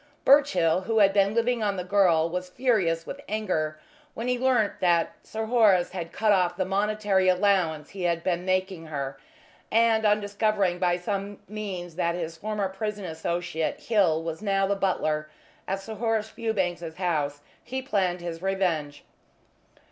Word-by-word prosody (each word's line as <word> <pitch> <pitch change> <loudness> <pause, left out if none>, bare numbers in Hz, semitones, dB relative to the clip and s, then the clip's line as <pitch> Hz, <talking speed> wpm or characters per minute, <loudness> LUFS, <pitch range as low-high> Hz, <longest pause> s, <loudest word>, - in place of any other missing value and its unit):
Birchill, 190 - +4
who 225 +2 0
had 200 -2 +5
been 200 +1 +3
living 235 0 +1
on 205 -2 0
the 180 - -2
girl, 180 -4 +3
was 180 +2 -4
furious 185 -8 +1
with 285 - -7
anger 160 -8 -1 0.4
when 230 +2 -4
he 250 -1 0
learnt 250 -5 +1
that 175 -3 +2
Sir 220 0 -5
Horace 215 -6 +4
had 170 -3 -5
cut 215 0 +1
off 185 -3 +2
the 185 - 0
monetary 200 -1 +1
allowance 180 -5 +1
he 195 - -8
had 170 -1 0
been 175 -1 0
making 185 -2 -1
her, 140 -3 -4 0.5
and, 225 -1 +3
on 210 0 +4
discovering 205 -3 0
by 175 -1 +2
some 200 +2 -4
means 190 -5 -6
that 170 -1 0
his 165 -2 -4
former 210 +2 -2
prison 205 +1 -4
associate 170 0 -3
Hill 180 -8 +2
was 165 +1 -5
now 195 -2 +1
the 200 +1 0
butler 155 -6 -1 0.4
at 195 +1 -1
Sir 220 +3 -7
Horace 220 0 -1
Fewbanks's 175 -7 -2
house, 150 -6 -1 0.2
he 260 +1 -4
planned 185 -8 0
his 170 -1 -5
revenge. 175 -7 -1
190 Hz, 165 wpm, -26 LUFS, 170-215 Hz, 0.5 s, had